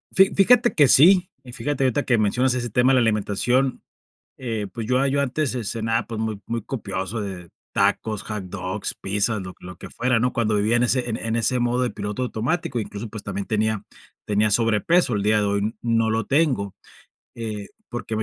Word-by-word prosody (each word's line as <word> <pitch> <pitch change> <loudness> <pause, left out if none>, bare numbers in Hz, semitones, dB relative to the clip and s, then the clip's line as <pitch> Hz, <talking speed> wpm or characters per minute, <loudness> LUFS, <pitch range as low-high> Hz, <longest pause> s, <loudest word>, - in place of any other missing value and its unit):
Fi 190 0 +5
fíjate 240 +5 +5
que 145 -4 +4
sí, 180 +7 +6 0.2
y 125 - -11
fíjate 135 +3 -2
ahorita, 130 +3 +1
que 120 - +2
mencionas 125 +5 +1
ese 120 -1 -3
tema 125 +4 +3
de - - +4
la 130 - +4
alimentación, 115 +4 +1 0.6
eh, 110 -5 -3
pues, 115 -2 -5
yo 130 +2 +2
yo 140 +1 +1
antes, 140 +2 -1
ce-cenaba, 115 -2 -2
pues, 115 -2 -5
muy 110 -2 -3
muy 115 -1 -3
copioso 105 -3 -4
de 95 -4 -7 0.2
tacos, 110 -2 +1
hot 105 -3 -5
dogs, 95 +2 -4
pizzas, 105 +2 -1
lo 90 0 -8
lo 90 -1 -10
que - - -10
fuera, 125 -1 0
¿no?, 125 +2 +1
cuando 110 -4 0
vivía, 105 +3 +2
en 120 - +3
ese 125 0 +1
en 110 - -2
en 115 0 -2
ese 120 +2 +1
modo, 120 +1 +1
de 125 - 0
piloto 105 +2 -5
automático, 125 +2 -2
incluso, 105 +1 -6
pues, 105 -2 -8
también 100 - -4
tenía 110 -1 0 0.4
tenía 105 0 +1
sobrepeso. 115 - +3
El 100 - -1
día 105 0 +3
de 105 - +1
hoy 100 +2 -1
no 115 -1 +1
lo 115 +1 0
tengo, 130 - +1 0.6
eh, 110 -3 -5 0.2
porque 120 -2 -4
me 110 - -1
115 Hz, 200 wpm, -23 LUFS, 105-125 Hz, 0.6 s, sí